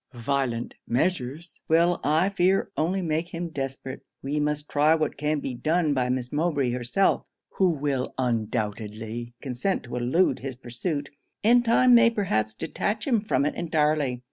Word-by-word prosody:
Violent 120 -1 -1
measures 145 +4 -2
will, 170 +2 +3
I 155 +6 +3
fear, 190 0 +2
only 185 +4 0
make 165 +1 -2
him 170 0 -3
desperate. 135 -2 -5 0.2
We 145 +3 -1
must 150 0 -1
try 150 +2 +4
what 155 -2 -1
can 150 +1 -1
be 135 - -4
done 155 +4 +1
by 125 -2 0
Miss 125 -1 -2
Mowbray 145 -5 +1
herself, 125 +10 +1 0.2
who 190 -2 +2
will 140 -5 -2
undoubtedly 110 -1 -3
consent 135 +9 -1
to 125 -1 -7
elude 130 +5 +2
his 135 -1 -5
pursuit, 140 +4 -4 0.3
and 240 +3 +5
time 245 +2 +5
may 235 -1 +7
perhaps 110 - -1
detach 210 - -2
him 235 -6 +2
from 210 -9 +1
it 150 - 0
entirely. 150 -6 0
145 Hz, 155 wpm, -26 LUFS, 125-175 Hz, 0.3 s, may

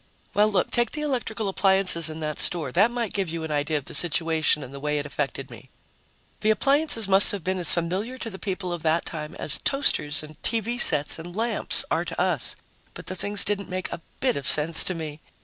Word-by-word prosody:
Well, 210 +1 +3
look, 200 - 0
take 240 0 0
the 300 - -2
electrical 240 -6 -3
appliances 190 -4 +4
in 155 +1 -7
that 150 -1 -4
store; 160 -7 +1
that 200 - +3
might 240 -3 -4
give 195 -4 -2
you 165 0 -5
an 160 - -5
idea 150 +1 -1
of 140 - -7
the - - -8
situation 160 -2 +2
and 130 +1 -11
the 140 - -8
way 150 +1 -2
it 145 - -3
affected 145 -1 -5
me. - - -14 0.7
The 215 - 0
appliances 275 -1 +4
must 195 +1 +6
have 200 -4 -5
been 185 +2 -2
as 170 -4 +3
familiar 185 +9 -1
to 230 -3 -5
the 190 - -9
people 185 -3 -4
of 170 - -6
that 160 +1 0
time 150 -1 -7
as - - -2
toasters 155 - +1
and 155 -1 -14
TV 235 +2 -1
sets 145 +2 +1
and 175 +2 -10
lamps 230 +2 +2
are - - 0
to - - -7
us. - - +1 0.4
But - - -9
the 185 - -2
things 200 +2 +3
didn't 200 -1 -2
make 185 0 -4
a - - -7 0.2
bit 255 -2 +1
of 140 -2 -4
sense 160 +2 +2
to 185 - -1
me 155 -2 -7
180 Hz, 225 wpm, -24 LUFS, 155-210 Hz, 0.7 s, must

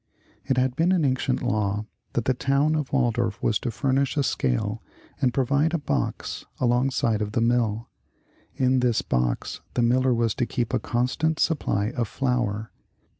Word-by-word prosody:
It 135 -2 0
had 130 0 +1
been 165 +5 +2
an 170 -5 +2
ancient 130 -1 0
law 105 -3 0 0.3
that 120 - -1
the 130 - +3
town 140 +4 +1
of 150 -3 -2
Waldorf 120 -4 +1
was 110 - +2
to 125 - -3
furnish 135 +4 0
a 140 - +3
scale 65 - -1 0.4
and 130 -3 +3
pro\dde 140 +6 +1
a - - +2
box 145 - -2 0.2
alongside 120 -3 +1
of 105 0 -3
the - - +1
mill. 115 -1 +1 0.7
In 130 0 +2
this 125 -3 +1
box 60 -1 -1
the 120 - +2
miller 130 +2 +3
was 115 -1 +1
to 120 - +1
keep 120 -3 -2
a - - +2
constant 140 +6 0
supply 105 -9 +1
of 120 -3 -2
flour. 120 -4 -1
125 Hz, 170 wpm, -25 LUFS, 115-135 Hz, 0.7 s, the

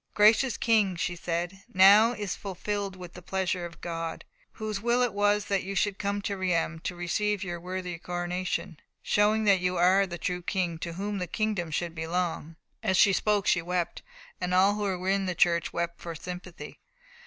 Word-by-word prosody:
"Gracious 220 +4 +5
King," 215 -5 +2
she 175 +1 -2
said, 175 +2 -3
"now 200 +4 +7
is 205 -4 -4
fulfilled 200 +1 -4 0.2
the 180 - -10
pleasure 185 -1 -2
of 170 - -16
God, 165 -1 -4 0.3
whose 215 -2 -4
will 240 +2 +2
it 245 - 0
was 205 0 +2
that 195 -2 0
you 195 +1 -5
should 200 0 0
come 200 0 -2
to 205 -2 -2
Reims 170 -3 -1
to 180 - -2
receive 200 +4 -1
your 175 -2 -4
worthy 180 0 -5
coronation, 175 -2 -3 0.2
showing 210 +1 +2
that 200 -3 +4
you 180 0 0
are 190 +3 +4
the 175 -1 -6
true 180 +1 -2
King 175 -3 -2
to 170 0 -5
whom 200 +3 -3
the 180 - -3
kingdom 205 -2 -1
should 170 +2 -2
belong." 165 -1 -3 0.3
As 190 - +1
she 200 - +6
spoke 210 0 +1
she 175 - +3
wept, 175 0 -2 0.4
and 180 0 -1
all 195 +2 +5
who 210 - -4 0.2
were 180 +1 -6
in 195 0 +1
the 180 - -2
church 170 -1 +2
wept 170 0 -3
for 170 -1 -6
sympathy. 180 -2 -8
185 Hz, 190 wpm, -28 LUFS, 175-205 Hz, 0.4 s, now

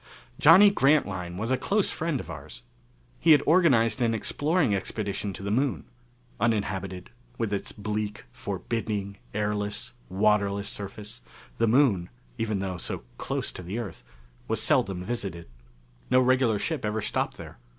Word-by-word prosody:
Johnny 190 +6 +8
Grantline 100 - +1
was 110 +5 -2
a 130 - +2
close 200 +8 +1
friend 160 -4 -1
of - - -7
ours. 75 -1 -9 0.6
He 165 -1 +7
had 145 - +4
organized 130 - +4
an 115 -1 +2
exploring 145 - +1
expedition 100 0 -2
to 95 - -8
the 100 - -2
Moon. 130 +4 0 0.5
Uninhabited, 100 -4 -1 0.3
with 110 -3 -1
its 100 - -2
bleak, 105 - -4
forbidding, 105 - -3 0.2
airless, 105 +2 -2 0.2
waterless 100 0 +2
surface, 105 +4 -6 0.4
the 115 - +3
Moon 110 -8 +3 0.3
even 110 -2 0
though 95 -2 -3
so 85 - -4 0.2
close - - -2
to - - -8
the 90 +5 -5
Earth 115 - -6 0.4
was 110 -1 0
seldom 110 -7 +2
visited. 95 -6 -4 0.6
No 130 - +5
regular 130 -3 +3
ship 155 +6 -2
ever 105 0 -1
stopped - - -1
there. - - -10
110 Hz, 145 wpm, -27 LUFS, 100-130 Hz, 0.6 s, Johnny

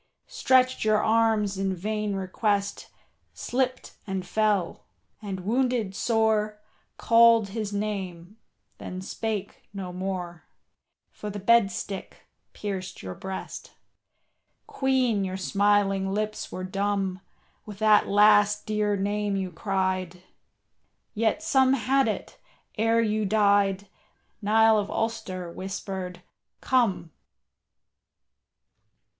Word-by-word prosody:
Stretched 255 0 +2
your 215 0 +3
arms 220 -3 +2
in 195 -1 -1
vain 210 +2 -2
request, 200 +1 -1 0.5
Slipped 255 0 -2
and 190 -2 -3
fell, 205 -3 0 0.3
and 195 -3 -5
wounded 235 -1 0
sore 215 -1 +1 0.4
Called 230 -2 +5
his 215 0 -4
name, 200 -2 -4 0.4
then 185 0 -6
spake 205 0 -4
no 185 -2 -5
more, 180 -2 -5 0.7
For 210 - -7
the 205 - -6
bed 215 +1 +4
stick 195 +1 -7 0.3
pierced 190 -2 -6
your 95 -1 -5
breast. 190 - -7 0.9
Queen, 255 -6 +1
your 190 0 -3
smiling 195 0 +1
lips 215 +1 -3
were 185 - -5
dumb 195 -1 -1 0.5
With 205 -2 -8
that 215 0 +4
last 210 0 +4
dear 210 -1 0
name 205 +1 -1
you 190 -2 -3
cried, 185 -1 -2 0.9
Yet 225 +7 0
some 265 -4 +3
had 270 +1 +2
it, 215 - -4 0.4
ere 225 +1 +2
you 215 0 0
died, 200 -1 +2 0.5
Niall 220 +1 +4
of 205 - -3
Ulster 195 -6 -3
whispered, 185 -1 -6 0.4
"Come." 230 -10 +1
205 Hz, 105 wpm, -26 LUFS, 190-220 Hz, 0.9 s, Called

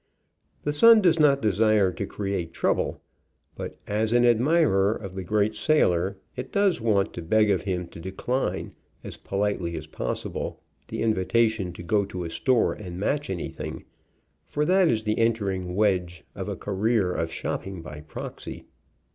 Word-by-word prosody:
The 145 - 0
Sun 225 +6 +7
does 165 -3 +4
not 140 -3 +4
desire 105 -2 +3
to 100 +2 -4
create 95 -6 -3
trouble, - - 0 0.5
but - - -7
as 110 +2 0
an 120 0 +5
admirer 120 - +3
of 95 -3 -7
the 95 0 -5
great 105 +3 +1
sailor 95 - +2 0.2
it 125 - -6
does 200 - +2
want 105 -4 +1
to - - -6
beg 105 +5 +3
of 95 - +1
him 90 -2 -1
to 85 - -11
decline, 95 +9 -2 0.3
as - - -7
politely 95 -4 -2
as - - -6
possible, - - -4 0.3
the - - -3
in 110 -1 +3
vitation 110 -1 +1
to 85 - -9
go 100 +4 +2
to 95 -2 -5
a 85 - -5
store 130 +4 +2
and 90 -4 -8
match 145 +8 -1
anything, 90 -3 -5 0.6
for 150 - -1
that 185 +2 +4
is 110 -5 +1
the 105 0 0
entering 100 -6 0
wedge 90 -5 +1
of - - -5
a - - -3
career 105 -1 0
of 80 -2 -2
shopping 95 -4 -4
by 75 -2 -8
proxy. 75 - -8
105 Hz, 165 wpm, -26 LUFS, 95-115 Hz, 0.6 s, Sun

